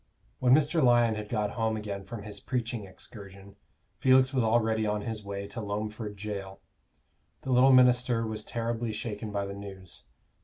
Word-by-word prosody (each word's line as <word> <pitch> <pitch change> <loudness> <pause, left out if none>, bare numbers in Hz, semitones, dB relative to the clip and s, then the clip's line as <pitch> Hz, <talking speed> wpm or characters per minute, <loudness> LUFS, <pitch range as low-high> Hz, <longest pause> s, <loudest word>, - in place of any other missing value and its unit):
When 125 0 +5
Mr. 155 +1 +2
Lyon 120 -2 +5
had 105 -1 -6
got 105 -3 -1
home 110 -2 -1
again 100 -2 -5
from 115 0 -8
his 105 -1 -8
preaching 120 -2 -3
excursion, 100 0 -12 0.4
Felix 130 0 +4
was 130 - +2
already 110 -1 +2
on 105 0 -1
his 110 -2 -5
way 100 0 -5
to 110 +3 -6
Loamford 105 +1 -4
Jail. 100 -1 -6 0.8
The 130 - -4
little 130 +2 +6
minister 125 -2 +4
was 110 -1 -4
terribly 115 0 -3
shaken 105 0 -5
by 100 -1 -2
the 100 - -6
news. 95 -3 -9
110 Hz, 165 wpm, -29 LUFS, 100-120 Hz, 0.8 s, little